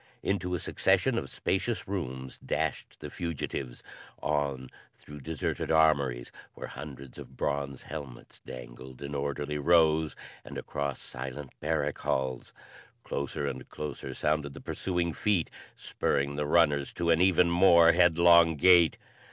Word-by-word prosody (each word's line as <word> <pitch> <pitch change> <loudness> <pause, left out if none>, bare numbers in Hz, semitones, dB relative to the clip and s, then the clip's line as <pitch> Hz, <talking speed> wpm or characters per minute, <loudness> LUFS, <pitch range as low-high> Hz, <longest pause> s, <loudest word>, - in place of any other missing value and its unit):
Into 90 -2 -1
a - - -3
succession - - +1
of 70 - -7
spacious - - -2
rooms 65 +1 -5
dashed 80 -2 -3
the - - -7
fugitives; 70 -7 -5 0.4
on 70 -3 -1 0.3
through 75 -1 -12
deserted 80 +1 -3
armories 70 -7 +2 0.2
where - - -7
hundreds 70 -3 -9
of - - -12
bronze 70 -1 -2
helmets 70 -5 -9
dangled 65 +2 -10
in 70 +1 -6
orderly 70 +1 -3
rows; 80 -1 +3 0.3
and - - -9
across 70 -1 -3
silent 65 +2 -7
barrack - - -1
halls. 65 -2 -2 0.5
Closer 70 +1 -3
and 65 -2 -5
closer 75 -1 -6
sounded 75 -2 -1
the - - -8
pursuing 90 -3 -2
feet, 100 -3 0 0.2
spurring 70 +1 -1
the 75 0 -2
runners 75 -3 +3
to 85 -1 0
an 80 +1 +3
even 90 -2 +4
more 85 -1 +6
headlong 85 -1 +5
gait. 85 +1 +5
75 Hz, 135 wpm, -29 LUFS, 70-85 Hz, 0.5 s, more